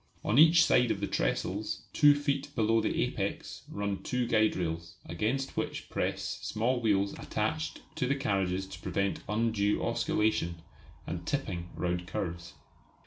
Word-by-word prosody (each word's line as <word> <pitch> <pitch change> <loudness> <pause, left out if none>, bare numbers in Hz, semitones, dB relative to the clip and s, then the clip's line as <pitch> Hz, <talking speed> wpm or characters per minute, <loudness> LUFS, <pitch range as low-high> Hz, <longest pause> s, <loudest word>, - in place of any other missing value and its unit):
On 120 - +3
each 165 +2 +8
side 125 -1 +4
of - - 0
the - - -1
trestles, 100 +4 -1
two 145 -1 +7
feet 145 -1 -1
below 115 0 +3
the - - +1
apex, - - -3
run 100 -1 -3
two 125 -1 -1
guide 110 -2 +3
rails, 85 -1 -3
against 110 +11 -2
which - - -3
press - - -2
small 120 +3 0
wheels 100 -3 +2
attached - - -2 0.2
to 125 - +1
the 140 - +2
carriages 95 -8 0
to 95 -2 -10
prevent 95 +2 -1
undue 105 -1 +1
oscillation 105 -5 +1 0.5
and 85 0 -5
"tipping" 90 -11 -2
round 90 +1 -2
curves. 85 -1 -4
105 Hz, 145 wpm, -30 LUFS, 90-125 Hz, 0.5 s, each